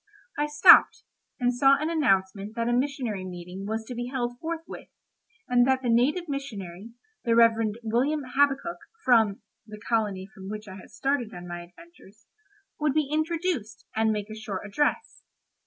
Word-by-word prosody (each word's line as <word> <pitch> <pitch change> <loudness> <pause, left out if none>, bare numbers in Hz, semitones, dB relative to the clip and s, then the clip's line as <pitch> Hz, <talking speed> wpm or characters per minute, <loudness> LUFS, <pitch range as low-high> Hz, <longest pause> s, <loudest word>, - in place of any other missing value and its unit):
I 295 0 0
stopped, 295 0 +7 0.4
and 245 -1 +2
saw 270 +3 +5
an 310 +2 -1
announcement 200 - 0
that 230 0 -1
a 240 - +1
missionary 250 -6 -1
meeting 180 +1 -7
was 220 +1 -3
to 250 - -7
be 240 0 -4
held 245 -2 -3
forthwith, 330 0 -6 0.6
and 245 0 +4
that 265 0 +2
the 240 - +1
native 290 +10 +2
missionary, 225 - -6 0.3
the 230 -2 +2
Rev. 230 0 +7 0.3
William 260 +7 0
Habakkuk, 285 +5 +1 0.3
from——(the 215 -2 +1
colony 205 -5 0
from 190 -2 -10
which 215 0 -7
I 190 -1 -9
had 185 - -13
started 270 -7 -2
on 175 0 -9
my 175 0 -6
adventures), 210 - -17 0.5
would 300 -2 +1
be 305 -3 +1
introduced, 315 - -2
and 220 0 +2
make 210 0 -3
a - - -6
short 215 -3 -5
address. 295 - -1
235 Hz, 160 wpm, -26 LUFS, 210-280 Hz, 0.6 s, stopped